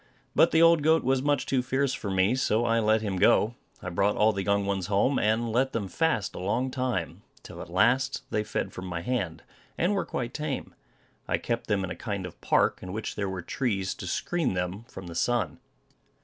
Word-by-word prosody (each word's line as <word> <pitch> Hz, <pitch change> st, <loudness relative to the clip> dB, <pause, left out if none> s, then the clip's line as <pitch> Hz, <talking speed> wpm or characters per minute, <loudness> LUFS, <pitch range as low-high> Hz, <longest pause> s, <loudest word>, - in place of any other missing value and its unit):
But -, -, +5 dB
the 165 Hz, 0 st, +4 dB
old 165 Hz, -2 st, +6 dB
goat 160 Hz, +2 st, +3 dB
was 130 Hz, +1 st, +2 dB
much 145 Hz, -2 st, +1 dB
too 130 Hz, -2 st, +1 dB
fierce 130 Hz, +2 st, 0 dB
for 100 Hz, -, -4 dB
me, 95 Hz, +3 st, +2 dB
so 120 Hz, -3 st, +1 dB
I 115 Hz, 0 st, +2 dB
let 110 Hz, 0 st, +2 dB
him 100 Hz, -3 st, -2 dB
go. 105 Hz, +4 st, +4 dB, 0.3 s
I 90 Hz, -, -4 dB
brought 100 Hz, +4 st, +1 dB
all 110 Hz, +1 st, +4 dB
the 100 Hz, -, -2 dB
young 100 Hz, +1 st, +1 dB
ones 95 Hz, -3 st, -1 dB
home, 105 Hz, +7 st, +2 dB
and 110 Hz, +2 st, +1 dB
let 130 Hz, +4 st, +1 dB
them 105 Hz, -4 st, -2 dB
fast 110 Hz, -, 0 dB
a -, -, -7 dB
long 120 Hz, +8 st, -1 dB
time, 125 Hz, -9 st, -2 dB, 0.2 s
till -, -, -9 dB
at -, -, -9 dB
last 125 Hz, +9 st, +2 dB
they 105 Hz, -, 0 dB
fed -, -, -3 dB
from 95 Hz, 0 st, -7 dB
my 85 Hz, -2 st, -3 dB
hand, 95 Hz, -8 st, -2 dB, 0.3 s
and 180 Hz, +5 st, +2 dB
were 200 Hz, -, 0 dB
quite 120 Hz, -1 st, -4 dB
tame. 150 Hz, -3 st, -4 dB, 0.5 s
I -, -, +1 dB
kept 115 Hz, -1 st, -3 dB
them 100 Hz, -3 st, +1 dB
in 95 Hz, -, -4 dB
a -, -, -4 dB
kind 100 Hz, -4 st, -4 dB
of 90 Hz, -, -10 dB
park, -, -, +2 dB
in 90 Hz, 0 st, -7 dB
which 110 Hz, +1 st, -4 dB
there 100 Hz, -2 st, -2 dB
were 95 Hz, -2 st, -5 dB
trees 100 Hz, -7 st, -1 dB
to 90 Hz, -, -8 dB
screen 165 Hz, -, -1 dB
them 90 Hz, +5 st, -3 dB
from 95 Hz, -5 st, -10 dB
the 85 Hz, -, -7 dB
sun. 100 Hz, -1 st, 0 dB
110 Hz, 220 wpm, -27 LUFS, 95-130 Hz, 0.5 s, old